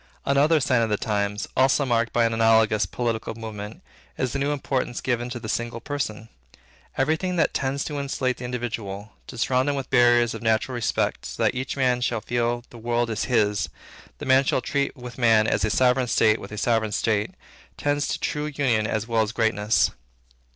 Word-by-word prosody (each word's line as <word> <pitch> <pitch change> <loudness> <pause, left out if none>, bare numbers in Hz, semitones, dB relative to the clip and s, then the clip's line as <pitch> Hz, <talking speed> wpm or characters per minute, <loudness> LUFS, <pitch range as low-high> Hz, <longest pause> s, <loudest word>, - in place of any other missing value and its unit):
Another 145 +3 +4
sign 130 -4 +2
of 115 - 0
our 105 - +1
times, 105 -1 -2
also 135 +2 +3
marked 115 -2 +1
by 120 -1 +3
an 115 - 0
analogous 110 -2 +3
political 115 +2 -3
movement, 110 -2 -8 0.3
is, 130 - -1
the 140 - -1
new 140 +1 0
importance 135 -3 -2
given 120 -1 -1
to 125 -1 -5
the 110 - -7
single 120 +1 -2
person. 115 -5 -4 0.7
Every 145 +4 +2
thing 180 +2 -3
that 170 - +2
tends 135 +1 -1
to 145 -2 -4
insulate 130 -2 -1
the 125 - -7
individual, 110 -4 -5 0.2
to 120 - -9
surround 130 +3 +1
him 145 - 0
with 135 -2 -5
barriers 120 -1 +4
of - - -7
natural 110 +3 +1
respect, 120 -4 -1
so - - -3
that - - +3
each 130 +2 -4
man 125 -2 +2
shall 120 -2 0
feel 120 +1 -1
the 120 - -11
world 120 0 0
is 110 - -1
his, 105 -5 +1 0.5
and - - -6
man 130 +1 +5
shall 135 - +1
treat 140 +3 -2
with 125 0 -9
man 110 -3 +5
as 105 - +1
a 110 - +2
sovereign 125 +3 +3
state 110 -1 +3
with 100 - -9
a 105 - -6
sovereign 110 -1 +1
state; 105 -1 0 0.4
tends 145 0 0
to - - -2
true 150 0 -2
union 130 -7 +1
as 110 -1 -2
well 115 -1 +2
as 110 -1 -1
greatness. 110 -2 +2
120 Hz, 200 wpm, -24 LUFS, 110-130 Hz, 0.7 s, man